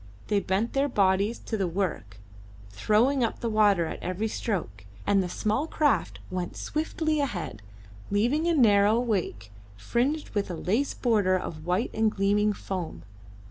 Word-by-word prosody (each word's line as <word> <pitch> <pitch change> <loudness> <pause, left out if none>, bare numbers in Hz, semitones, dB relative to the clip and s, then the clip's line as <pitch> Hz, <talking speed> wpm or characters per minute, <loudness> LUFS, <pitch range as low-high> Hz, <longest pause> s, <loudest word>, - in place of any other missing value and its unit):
They 205 -1 +3
bent 200 +4 -1
their 275 +1 +2
bodies 200 0 +2
to 220 - -2
the 195 -3 0
work, 165 - -3 0.5
throwing 225 - +2
up 230 - -1
the 230 - -2
water 205 -5 +4
at - - -6
every 185 +5 -2
stroke, 180 - -3 0.2
and 200 -1 +3
the 180 - -3
small 215 - -1
craft 300 -3 +1
went 180 -1 -4
swiftly 315 0 -1
ahead, 190 - -3 0.5
leaving 245 +11 +1
a 340 - +2
narrow 215 -4 +5
wake 185 - -2 0.3
fringed 260 - -1
with 205 -2 -1
a 175 - -3
lace 220 - -1
like - - -21
border 205 -6 +3
of 160 -2 -7
white 180 +6 0
and 220 0 +2
gleaming 205 +1 +2
foam. 185 -4 -5
205 Hz, 160 wpm, -27 LUFS, 185-235 Hz, 0.5 s, narrow